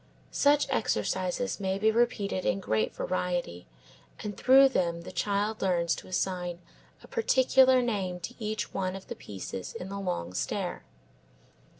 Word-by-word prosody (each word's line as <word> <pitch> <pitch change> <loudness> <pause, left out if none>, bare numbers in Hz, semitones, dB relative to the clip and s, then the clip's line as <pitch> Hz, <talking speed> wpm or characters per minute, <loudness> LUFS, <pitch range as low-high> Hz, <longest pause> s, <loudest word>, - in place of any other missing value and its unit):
Such 290 +1 +4
exercises 190 - -1
may 190 -1 -1
be 215 +2 +3
repeated 215 -5 0
in 190 - +1
great 110 - 0
variety 175 - -2 0.6
and 205 -1 -4
through 270 +1 +6
them 170 -8 0
the - - -9
child 205 +1 -1
learns 170 -3 +2
to - - -10
assign 180 -1 -2 0.5
a - - -13
particular 260 - +4
name 195 -6 -2
to 235 - -5
each 215 -1 -3
one 185 -1 -2
of 195 - -10
the - - -4
pieces 95 -2 -7
in 180 - -6
the 200 0 -5
long 90 - -3
stair. - - -3
195 Hz, 145 wpm, -29 LUFS, 180-225 Hz, 0.6 s, through